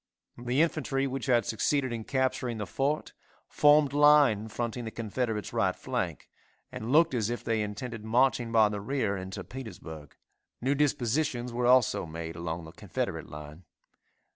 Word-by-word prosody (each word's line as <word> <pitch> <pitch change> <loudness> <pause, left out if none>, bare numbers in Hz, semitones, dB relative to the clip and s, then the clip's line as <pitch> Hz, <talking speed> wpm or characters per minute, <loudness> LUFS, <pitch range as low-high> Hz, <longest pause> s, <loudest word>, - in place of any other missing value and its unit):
The 125 +5 +2
infantry 145 -4 -1
which 135 0 -4
had 120 -4 +3
succeeded 130 +3 0
in 115 -2 -5
capturing 130 -3 -1
the 105 - -3
fort 135 - -2 0.3
formed 145 -1 +4
line 145 -7 +5
fronting 120 +2 -4
the 115 - -4
Confederates' 110 -1 -3
right - - +1
flank, - - -3 0.4
and 110 +3 -5
looked 165 +2 +5
as 115 -3 0
if 120 - -4
they 115 -1 0
intended 105 +2 -5
marching 120 +1 +2
by 110 -2 +5
the 105 -1 -4
rear 110 -3 -1
into 95 0 -6
Petersburg. 80 - -9 0.4
New 135 +3 +1
dispositions 130 -2 0
were 120 0 0
also 125 -8 +4
made 80 +1 -6
along 85 0 -4
the 80 - -10
Confederate - - -4
line. 75 +3 -10
120 Hz, 155 wpm, -29 LUFS, 105-135 Hz, 0.4 s, line